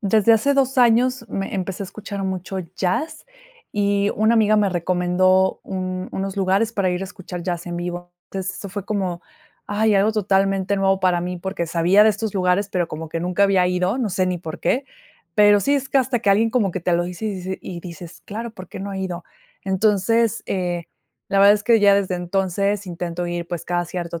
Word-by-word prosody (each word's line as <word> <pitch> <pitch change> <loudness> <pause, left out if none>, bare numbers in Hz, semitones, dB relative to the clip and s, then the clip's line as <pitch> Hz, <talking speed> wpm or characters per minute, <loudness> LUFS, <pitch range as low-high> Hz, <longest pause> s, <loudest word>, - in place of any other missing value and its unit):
desde 215 +2 +4
hace 280 +6 +3
2 270 -1 +1
años 245 +1 +3
me 195 +1 -4
empecé 190 +1 -3
a - - -5
escuchar 200 -1 -6
mucho 190 0 -4 0.2
jazz 310 - -2 0.5
y 200 0 +1
una 220 +2 +3
amiga 215 -1 +4
me 205 -2 +3
recomendó 185 +2 +2
un 185 -1 -4
unos 195 +1 -3
lugares 195 +4 +1
para 195 -4 +1
ir 180 - -2
a - - -2
escuchar 185 -3 -8
jazz 175 -1 -3
en 175 - -4
vivo. 175 0 -5 0.2
Entonces, 190 0 -4
eso 200 - -7
fue 200 -1 -5
como, 185 -4 -2 0.5
ay, 210 +1 +2
algo 205 +3 +3
totalmente 195 -1 +1
nuevo 195 0 +2
para 180 -2 +2
mí, 180 +1 -3
porque 190 -1 -3
sabía 175 +5 +4
de - - +6
estos 215 0 -4
lugares, 185 +2 +1
pero 175 -2 -1
como 155 +1 -6
que 165 - -4
nunca 180 +3 0
había 190 -2 +3
ido, 180 +6 0
no 235 -5 0
sé 185 0 +1
ni 180 -1 -1
por 160 -2 -7
qué, 265 +3 +1 0.5
pero 205 -1 +6
sí 280 +7 +2
es 275 -1 -1
que 270 - +3
hasta 255 -2 0
que 200 - +2
alguien 225 +3 +3
como 220 -6 +1
que 185 - -3
te 175 +1 0
lo 175 0 +1
dice 180 +5 -5
y 215 - -1
dice 185 +1 -5
y 175 -2 -7
dices: 170 -1 -10
"Claro, 230 +3 -5
¿por 185 -4 -11
qué - - -8
no 200 0 -5
he 190 - -4
ido?", 180 -2 -4 0.4
entonces, 215 +4 +2
eh, 175 -3 -2 0.4
la 195 - +1
verdad 200 +1 +8
es 205 - -4
que 225 -1 +4
ya 200 -1 +6
desde 195 -2 0
entonces 195 +2 -1
intento 175 0 -4
ir, 175 0 -4
pues, 175 -2 -4
cada 175 0 -1
cierto 170 -1 -5
195 Hz, 215 wpm, -21 LUFS, 180-210 Hz, 0.5 s, verdad